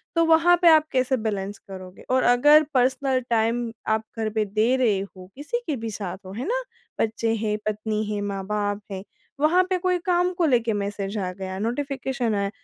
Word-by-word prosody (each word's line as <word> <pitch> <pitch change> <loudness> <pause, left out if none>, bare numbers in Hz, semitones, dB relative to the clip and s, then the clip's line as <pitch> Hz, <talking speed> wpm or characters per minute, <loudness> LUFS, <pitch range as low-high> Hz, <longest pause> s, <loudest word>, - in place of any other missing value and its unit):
तो 335 - +4
वहाँ 330 +2 +5
पे 350 - +5
आप 315 -1 +5
कैसे 260 0 +1
बैलेंस 205 -3 -3
करोगे? 185 -1 -11
और 255 0 +2
अगर 295 +6 +6
पर्सनल 260 +1 +2
टाइम 230 +1 +1 0.2
आप 220 0 +1
घर 220 -1 -1
पे 215 0 -1
दे 215 +5 +1
रहे 225 -7 +2
हो 185 -2 -10
किसी 295 - -3
के 300 - 0
भी 225 -2 -5
साथ 195 -3 -5
हो, 185 - -8
है 235 +5 -5
ना? - - 0 0.4
बच्चे 225 +1 0
हैं 210 -1 -1
पत्नी 215 0 -2
है 205 - -2
माँ-बाप 205 +1 -2
हैं। 190 -1 -5 0.4
वहाँ 330 +5 +4
पे 370 - +1
कोई 365 0 +1
काम 360 0 +2
को 345 - +2
लेके 235 -6 +2
मैसेज 200 0 -3
आ 185 -3 -2
गया 190 0 -6
नोटिफिकेशन 255 0 -2
आया। 200 0 0
225 Hz, 195 wpm, -24 LUFS, 205-275 Hz, 0.4 s, अगर